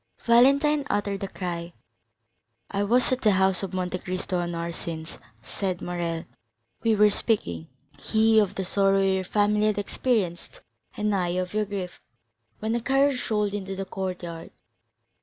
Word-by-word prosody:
Valentine 280 Hz, +5 st, +5 dB
uttered 200 Hz, -1 st, -1 dB
a -, -, -2 dB
cry. 175 Hz, -2 st, -5 dB, 1.0 s
"I 200 Hz, -, -1 dB
was 240 Hz, +6 st, +3 dB
at 255 Hz, 0 st, 0 dB
the 210 Hz, -3 st, +4 dB
house 190 Hz, 0 st, +2 dB
of 195 Hz, -, -4 dB
Monte 185 Hz, -1 st, -2 dB
Cristo 185 Hz, 0 st, -3 dB
an 175 Hz, 0 st, -3 dB
hour 170 Hz, 0 st, -3 dB
since," 165 Hz, -1 st, -6 dB, 0.2 s
said 185 Hz, -3 st, -3 dB
Morrel; 170 Hz, -2 st, -3 dB, 0.6 s
"we 225 Hz, -1 st, +3 dB
were 210 Hz, 0 st, +5 dB
speaking, 85 Hz, -, -1 dB, 0.3 s
he 220 Hz, +5 st, +3 dB
of 205 Hz, -3 st, +1 dB
the 190 Hz, -, -2 dB
sorrow 195 Hz, +1 st, +3 dB
your 190 Hz, -1 st, +1 dB
family 210 Hz, +2 st, +2 dB
had 210 Hz, -2 st, 0 dB
experienced, 205 Hz, -, -2 dB, 0.4 s
and 210 Hz, 0 st, 0 dB
I 185 Hz, -3 st, +1 dB
of 185 Hz, 0 st, -2 dB
your 215 Hz, 0 st, +1 dB
grief, 190 Hz, -3 st, -6 dB, 0.6 s
when 220 Hz, +1 st, -2 dB
a 235 Hz, -, 0 dB
carriage 270 Hz, +1 st, +1 dB
rolled 210 Hz, -2 st, 0 dB
into 195 Hz, -1 st, -4 dB
the 195 Hz, 0 st, -4 dB
courtyard. 180 Hz, -4 st, -5 dB
195 Hz, 160 wpm, -26 LUFS, 180-215 Hz, 1.0 s, Valentine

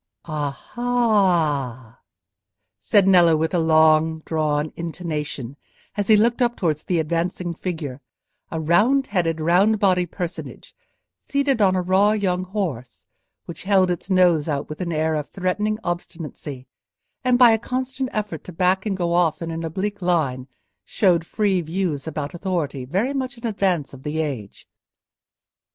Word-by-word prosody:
"A–ah!" 155 Hz, -, 0 dB, 0.8 s
said 200 Hz, -2 st, +3 dB
Nello, 175 Hz, -4 st, +6 dB
with 160 Hz, +3 st, -1 dB
a 175 Hz, -, +2 dB
low 165 Hz, -, 0 dB, 0.3 s
long 160 Hz, 0 st, -4 dB
drawn 155 Hz, -1 st, 0 dB
intonation, 150 Hz, -6 st, -5 dB, 0.4 s
as 205 Hz, -2 st, -2 dB
he 215 Hz, -, +6 dB
looked 235 Hz, +4 st, +2 dB
up 240 Hz, -1 st, +2 dB
towards 155 Hz, -4 st, -1 dB
the 180 Hz, -, 0 dB
advancing 170 Hz, +2 st, -1 dB
figure—a 160 Hz, -2 st, -7 dB
round 210 Hz, -, +3 dB
headed, 165 Hz, -5 st, -1 dB
round 180 Hz, +7 st, +3 dB
bodied 185 Hz, -4 st, +2 dB
personage, 175 Hz, -1 st, -7 dB, 0.5 s
seated 280 Hz, -4 st, +1 dB
on 190 Hz, -2 st, +4 dB
a 185 Hz, -, 0 dB
raw 195 Hz, +3 st, +3 dB
young 185 Hz, -3 st, 0 dB
horse, 175 Hz, -, -4 dB, 0.4 s
which 170 Hz, -, -8 dB
held 190 Hz, -2 st, +3 dB
its 175 Hz, +2 st, -5 dB
nose 175 Hz, -5 st, +3 dB
out 140 Hz, -2 st, -2 dB
with 155 Hz, +4 st, -7 dB
an 175 Hz, -1 st, -2 dB
air 160 Hz, 0 st, 0 dB
of 150 Hz, -2 st, -3 dB
threatening 210 Hz, +3 st, -1 dB
obstinacy, 160 Hz, -6 st, -6 dB, 0.6 s
and 250 Hz, -1 st, +3 dB
by 245 Hz, -2 st, +7 dB
a 225 Hz, -, +2 dB
constant 260 Hz, +2 st, -3 dB
effort 210 Hz, -7 st, -4 dB
to -, -, -8 dB
back 185 Hz, +4 st, +1 dB
and 195 Hz, -2 st, -1 dB
go 170 Hz, -2 st, 0 dB
off 170 Hz, -3 st, +2 dB
in 165 Hz, -1 st, -4 dB
an 165 Hz, 0 st, -4 dB
oblique 195 Hz, +5 st, -3 dB
line 145 Hz, -8 st, 0 dB, 0.4 s
showed 175 Hz, -, +2 dB
free 195 Hz, +1 st, 0 dB
views 165 Hz, -3 st, -3 dB
about 150 Hz, -1 st, -4 dB
authority 170 Hz, -8 st, -3 dB
very 195 Hz, -, -1 dB
much 260 Hz, -3 st, -3 dB
in 235 Hz, -, -9 dB
advance 190 Hz, -, 0 dB
of 135 Hz, -, -11 dB
the 150 Hz, +2 st, -3 dB
age. 130 Hz, -10 st, -5 dB
175 Hz, 150 wpm, -22 LUFS, 155-200 Hz, 0.8 s, by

